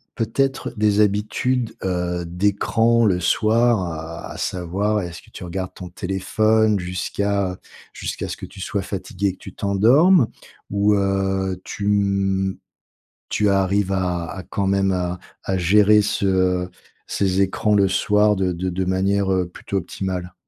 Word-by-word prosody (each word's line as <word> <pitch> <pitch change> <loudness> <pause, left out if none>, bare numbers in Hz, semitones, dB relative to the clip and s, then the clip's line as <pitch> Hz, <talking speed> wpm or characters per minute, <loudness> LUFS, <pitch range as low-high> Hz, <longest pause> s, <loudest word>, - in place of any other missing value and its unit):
peut-être 135 +4 -1
des 105 -1 +2
habitudes, 110 +4 0
heu, 90 -1 -1
d'écran 105 +6 +2
le 95 -4 +2
soir? 90 -6 0
A - - -8
savoir, 100 +4 -1
est-ce 85 -1 -7
que - - -21
tu 95 - -9
regardes 95 +1 -5
ton 90 - -8
téléphone 105 +4 +1
jusqu'à, 95 +2 -1
heu, 90 - -8 0.4
jusqu'à - - -4
ce - - -5
que - - -7
tu 95 0 -12
sois 100 +1 -2
fatiguée 100 0 -3
et - - -4
que - - -18
tu 95 - -10
t'endormes? 120 - +4 0.4
Ou 100 +1 +3
heu, 95 -1 0
tu 100 - -5
m 100 -2 +1 0.7
tu 105 -1 +1
arrives 100 0 +1
à 90 -3 -1
à 95 - -6
quand 100 - -3
même 95 0 +2
à 90 -1 -2 0.2
à 95 - -1
gérer 105 +4 +5
ce 95 -3 +1 0.4
ces 95 -1 +1
écrans 105 +2 +1
le 100 -1 +4
soir 105 +2 +3
de 95 -2 0
de 90 +2 -2
de 95 +1 -2
manière, 95 +1 +1
heu, 90 -1 0
plutôt 100 - -5
optimale? 90 0 -4
95 Hz, 150 wpm, -21 LUFS, 90-105 Hz, 0.7 s, gérer